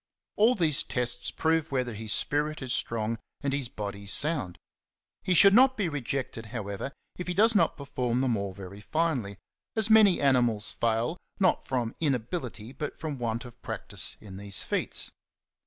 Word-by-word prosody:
All 225 +4 +5
these 160 -7 +2
tests 125 0 -2
prove 160 -1 0
whether 125 -3 -1
his 110 0 -5
spirit 150 +3 0
is 130 -1 -1
strong 115 -1 -1 0.2
and 140 -1 -1
his 135 -4 -2
body 100 -1 -6
sound. 120 - +1 0.6
He 185 - +1
should 195 +3 +8
not 260 +3 +6
be 195 -5 0
rejected, 135 -5 -3
however, 105 +2 -4 0.3
if 180 - -4
he 180 - -2
does 225 +4 +5
not 205 - +3
perform 125 -3 -1
them 125 -3 +2
all 100 -2 -3
very 95 +1 -10
finely; 130 - -1 0.4
as 220 0 +1
many 215 -4 +7
animals 120 -7 +3
fail, 115 +8 0 0.2
not 190 -2 +2
from 120 -3 -1
inability 125 -4 -2
but 145 +2 -5
from 150 -4 -5
want 115 0 -2
of 120 - -13
practice - - -1
in 95 -3 -10
these 100 -2 0
feats. - - -1
130 Hz, 165 wpm, -28 LUFS, 110-160 Hz, 0.6 s, should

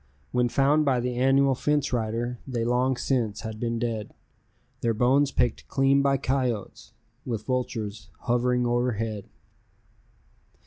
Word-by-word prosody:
When 125 -1 +2
found 140 +4 +3
by 135 -4 +2
the 125 +1 -2
annual 135 +2 +3
fence 145 +1 0
rider, 115 +1 -2
they 120 -3 -2
long 125 +2 +1
since 115 -7 -1
had 110 -1 -6
been 115 0 -1
dead, 115 -3 -3 0.7
Their 115 -1 +1
bones 135 +5 +3
picked 125 -2 0
clean 135 +1 +3
by 140 0 +2
coyotes, 130 -5 -2 0.3
with 115 -5 -4
vultures 110 -6 -3
hovering 125 0 +1
o'erhead. 115 -4 -1
125 Hz, 130 wpm, -26 LUFS, 115-135 Hz, 0.7 s, found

